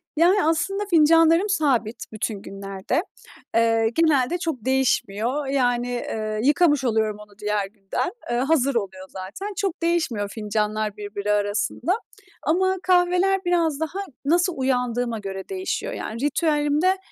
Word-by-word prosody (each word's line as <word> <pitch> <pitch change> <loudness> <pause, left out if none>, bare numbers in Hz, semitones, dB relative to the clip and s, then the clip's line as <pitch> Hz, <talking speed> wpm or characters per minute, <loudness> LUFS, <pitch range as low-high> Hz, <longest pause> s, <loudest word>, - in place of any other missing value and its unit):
Yani 355 +6 +4
aslında 345 +6 0
fincanlarım 330 +3 +5
sabit 260 - 0
bütün 215 -2 -3
günlerde. 195 +7 -3 0.5
Eee, 225 -1 +3
genelde 315 -2 +3
çok 320 -10 -4
değişmiyor. 260 0 0
Yani, 245 -2 0
ııı, 215 -1 -3
yıkamış 295 0 +4
oluyorum 220 -3 +1
onu 210 -1 -15
diğer 210 -1 -1
günden. 195 - -3 0.2
Iıı, 240 +1 +1
hazır 275 -2 +2
oluyor 190 -4 -3
zaten. 195 - -6
Çok 385 -3 -2
değişmiyor 315 -12 0
fincanlar 210 0 -2
birbiri 205 0 -3
arasında. 210 - 0 0.5
Ama 375 +5 +2
kahveler 365 +1 +3
biraz 335 -4 +1
daha 320 +4 -3 0.3
nasıl 345 +4 +2
uyandığıma 245 -3 0
göre 195 -1 -6
değişiyor. 380 -1 -3
Yani 225 - -5
ritüelimde 295 +4 +2
260 Hz, 125 wpm, -23 LUFS, 215-330 Hz, 0.5 s, fincanlarım